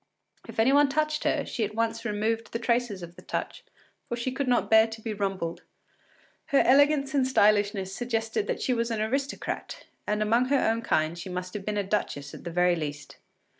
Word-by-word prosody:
If - - -7
any 245 +5 +4
one 285 0 +5
touched 305 +2 0
her, - - +1
she 235 - -2
at 210 0 -3
once 230 0 -1
removed 225 +1 -1
the - - 0
traces 235 -5 0
of 170 0 -10
the - - -13
touch, - - -4 0.5
for 240 - -1
she 245 +2 -2
could 270 +1 -2
not 245 -1 +2
bear 220 0 +6
to 225 0 -8
be 220 0 -4
rumpled. 195 -5 -3 0.9
Her 280 -3 +4
elegance 280 +1 +4
and 270 -3 +2
stylishness 205 -5 +2
suggested 230 - -2
that - - -2
she 255 - +1
was 235 -1 0
an 225 -2 -2
aristocrat, 270 +6 -3 0.2
and 210 0 +1
among 230 +4 +3
her 280 +2 +2
own 225 -2 +1
kind 160 -5 0
she 180 - -7
must 180 0 -5
have 205 -2 -6
been 210 -1 -2
a 205 - +1
duchess 165 -8 -2
at - - -11
the - - -3
very 180 +1 +3
least. 145 -3 -6
225 Hz, 205 wpm, -27 LUFS, 195-250 Hz, 0.9 s, bear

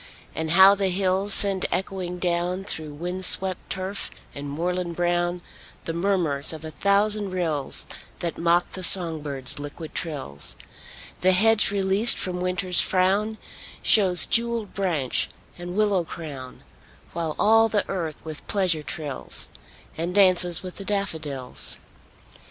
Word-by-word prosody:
And 160 0 -3
how 190 +4 +7
the 200 -1 -1
hills 190 +2 0
send 195 -2 +4
echoing 180 -1 -3
down, 180 +1 -2
Through 155 -6 -5
wind 180 +4 -5
swept 185 0 +3
turf 190 +1 -5 0.2
and 140 0 -7
moorland 175 +3 -3
brown, 175 0 -1 0.4
The 165 - -4
murmurs 170 -6 +1
of 160 0 -9
a 160 - -7
thousand 205 +2 +1
rills 160 -7 -1 0.3
That 170 -2 -4
mock 170 +1 +1
the 185 - -6
song 170 -4 +6
birds' 140 -2 -6
liquid 145 +2 -9
trills! 135 - -6 0.6
The 185 +1 +3
hedge 220 +3 +5
released 200 +3 +4
from 180 -1 -3
Winter's 180 0 +1
frown 195 +4 0 0.5
Shews 185 -5 +6
jewelled 235 -3 -1
branch 165 -10 -1 0.3
and 175 +1 -7
willow 205 -4 +1
crown; 145 -6 -9 0.5
While 165 -2 -4
all 225 +1 +4
the 205 -1 -1
earth 165 -6 -5
with 155 -2 -9
pleasure 185 -6 0
trills, 145 0 -3 0.5
And 175 +3 -3
'dances 180 -3 +4
with 185 -1 -8
the 200 - -7
daffodils. 160 -11 -4
180 Hz, 135 wpm, -24 LUFS, 160-195 Hz, 0.6 s, how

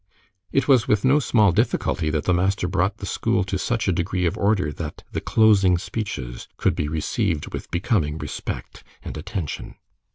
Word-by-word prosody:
It 135 - +1
was 130 -5 +5
with 105 +1 +2
no 135 +3 +5
small 110 -8 +4
difficulty 90 -5 0
that 75 -1 -1
the 90 - +2
master 95 +1 +1
brought 95 +1 0
the - - -6
school 95 - 0
to 95 0 -3
such 115 0 -1
a - - +4
degree 90 +1 -1
of 85 +3 +1
order 100 -7 +1
that - - -7
the - - -3
closing 100 -5 +4
speeches 85 - -5
could - - +2
be 75 - -1
received 75 0 -1
with - - -6
becoming 85 - 0
respect 75 -2 -6 0.2
and - - -6
attention. 80 +1 -5
95 Hz, 175 wpm, -23 LUFS, 80-110 Hz, 0.2 s, was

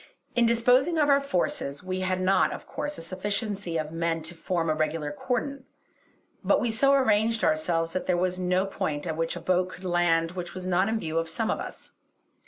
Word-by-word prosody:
In 240 -1 +4
disposing 250 +8 +3
of 295 -2 +3
our 280 0 +5
forces, 175 - -2
we 185 0 -3
had 185 0 0
not 185 +1 +3
of - - -7
course 295 0 -4
a - - -7
sufficiency 200 0 -2
of 155 -1 -3
men 165 -1 -1
to 160 +2 -4
form 170 0 -2
a 155 - +2
regular 155 -1 -1
cordon; 255 +5 -3 0.8
but - - +3
we 240 - 0
so 275 +5 +3
arranged 225 -4 +3
ourselves 165 +1 +1
that 185 - -3
there 180 - +2
was 180 +1 0
no 180 +1 +1
point 180 -6 -3
at 160 -2 -2
which 165 +1 -1
a - - -5
boat 185 0 +1
could 185 0 -11
land 170 -2 +2
which 180 -1 -6
was 185 0 -5
not 185 +2 +2
in 225 - 0
view 165 -3 -1
of 165 0 -3
some 225 +6 -1
of - - -2
us. - - -8
185 Hz, 210 wpm, -27 LUFS, 165-220 Hz, 0.8 s, our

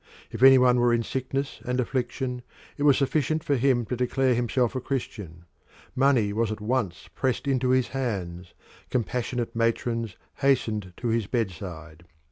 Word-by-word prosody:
If 115 - -7
any 135 0 +9
one 125 -1 +4
were 120 -1 +4
in 115 - 0
sickness 135 +3 -3
and 125 +1 -1
affliction 125 0 -2 0.3
it - - -9
was 145 -2 +5
sufficient 155 +2 0
for 145 - +1
him 125 -2 +2
to 115 - -3
declare 125 +1 +1
himself 120 +1 0
a 130 - -2
Christian: 105 - -5 0.5
money 130 -6 +3
was 110 0 0
at 110 - -4
once 105 -7 -2
pressed 130 +1 -1
into 130 -2 +1
his 130 -1 +2
hands: 95 -9 -4 0.3
compassionate 120 0 -2
matrons 115 -2 -1 0.2
hastened 115 -9 0
to 120 - -2
his 115 -3 0
bedside. 85 -7 -4
120 Hz, 155 wpm, -26 LUFS, 110-130 Hz, 0.5 s, any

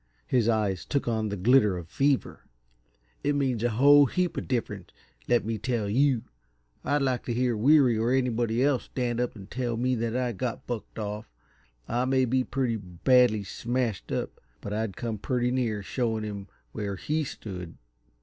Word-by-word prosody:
His 115 - +2
eyes 105 -5 0
took 140 - -2
on 110 -2 0
the 100 - -3
glitter 105 -1 +4
of 85 -2 -7
fever. 135 - 0 0.8
"It 145 0 +1
makes 130 -5 0
a 120 - +2
whole 140 +5 +6
heap 180 +5 -1
of - - -4
difference, 105 -7 -3 0.4
let 120 -4 +2
me 110 -1 -2
tell 120 -5 -1
you! 125 +2 +2 0.6
I'd 145 0 +1
like 130 -2 0
to 120 - -2
hear 125 -1 +1
Weary 125 0 +4
or 115 +2 +1
anybody 120 -2 +1
else 140 -2 +1
stand 120 -2 -2
up 125 -1 -1
and 100 -2 -12
tell 120 -3 -2
me 125 +2 +1
that 115 0 -1
I 125 -1 0
got 120 +2 -4
bucked 120 -3 -6
off. 105 0 -5 0.6
I 120 +2 0
may 130 0 +2
be 130 +1 +1
pretty 125 -3 -1
badly 110 +4 +3
smashed 115 +2 -3
up, - - -3 0.2
but 100 - -6
I'd 110 -2 -2
come 115 -3 -3
pretty 125 +2 0
near 115 -5 -1
showing 110 0 -1
him 100 -2 -6 0.2
where 100 - -4
he 155 +11 -1
stood." 90 - -7
120 Hz, 180 wpm, -27 LUFS, 105-130 Hz, 0.8 s, whole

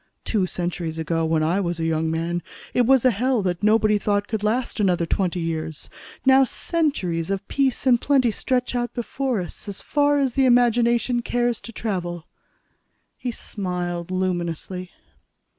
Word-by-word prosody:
"Two 200 -5 +1
centuries 175 -2 -3
ago, 165 +1 -1
when 160 -1 +1
I 170 +5 +1
was 175 -3 -2
a 165 - -1
young 160 0 0
man, 165 +2 -1 0.3
it 245 -2 +3
was 265 -1 +5
a 255 - +6
hell 240 +1 +1
that 175 -2 -1
nobody 215 0 +3
thought 205 0 0
could 220 -3 -2
last 235 +3 -1
another 180 -4 +2
twenty 180 0 0
years. 160 -2 -4 0.3
Now 265 0 +7
centuries 245 - -1
of 195 0 -2
peace 270 -2 0
and 245 -2 +4
plenty 265 -5 +3
stretch 250 +3 -1 0.2
before 250 0 -2
us 180 - -7
as 200 -1 -3
far 290 0 +2
as 270 -3 +1
the 270 +1 +3
imagination 240 0 +3
cares 240 0 0
to 230 - -9
travel." 175 -7 -3 0.9
He 250 - -4
smiled 180 -6 -4
luminously. 180 0 -2
205 Hz, 160 wpm, -23 LUFS, 175-245 Hz, 0.9 s, Now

